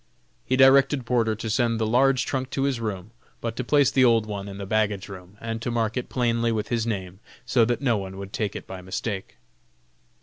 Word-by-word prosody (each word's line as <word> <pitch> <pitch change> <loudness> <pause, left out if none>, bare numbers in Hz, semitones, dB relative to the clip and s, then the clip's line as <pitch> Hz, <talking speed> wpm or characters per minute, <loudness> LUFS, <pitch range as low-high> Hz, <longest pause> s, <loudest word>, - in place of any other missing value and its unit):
He 130 - +2
directed 135 0 +5
Porter 115 -2 +1
to 110 +1 -6
send 115 +1 +1
the 110 - +1
large 130 +4 +3
trunk 130 -1 -2
to 135 - -2
his 135 -3 0
room, 105 -2 -4 0.3
but 115 -1 -4
to 130 - -3
place 140 0 +3
the 130 - +4
old 115 -3 +4
one 100 -2 -5
in 100 -1 -8
the 100 - -5
baggage 105 -1 0
room, 95 0 -11
and 115 0 -4
to 120 - -2
mark 115 -2 -1
it 125 - -3
plainly 115 -2 +1
with 110 -2 -2
his 115 -1 0
name, 95 -4 -4 0.3
so 120 -3 +3
that 120 +3 -1
no 120 -5 +2
one 95 -1 -6
would 100 0 -8
take 105 -3 -2
it - - -6
by 95 -1 -8
mistake. 95 +2 -5
115 Hz, 225 wpm, -25 LUFS, 100-125 Hz, 0.3 s, directed